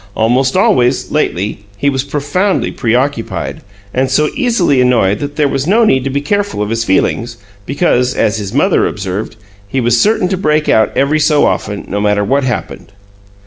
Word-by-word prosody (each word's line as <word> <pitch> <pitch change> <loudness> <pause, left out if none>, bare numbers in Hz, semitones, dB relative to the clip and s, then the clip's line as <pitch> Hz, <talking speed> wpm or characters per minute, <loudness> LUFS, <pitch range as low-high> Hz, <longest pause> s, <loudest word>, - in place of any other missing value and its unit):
Almost 125 +4 +1
always, 125 +1 +2
lately, 105 - -1 0.2
he 140 - -1
was 135 -2 0
profoundly 145 +8 -1
preoccupied, 125 +1 -2 0.3
and 130 +1 0
so 150 +3 +2
easily 220 - +1
annoyed 115 -6 +2
that 145 0 -5
there 150 -2 +2
was 135 +1 -2
no 225 +5 +4
need 130 -10 +2
to - - -1
be 140 +1 -2
careful 205 - -2
of 105 - -4
his 115 0 0
feelings, 115 +3 0 0.3
because 130 -4 +1
as 110 +1 +1
his 100 -2 -5
mother 160 - +2
observed 100 +1 -5 0.3
he 130 - -2
was 120 -1 +2
"certain 215 -3 +2
to 190 - -1
break 155 -3 0
out 110 - +4
about - - -11
every 145 +3 +2
so 150 -1 +3
often, 105 -1 -2
no 100 +1 -2
matter 105 0 +1
what 135 +7 +1
happened!" 120 -4 -4
130 Hz, 185 wpm, -14 LUFS, 115-150 Hz, 0.3 s, no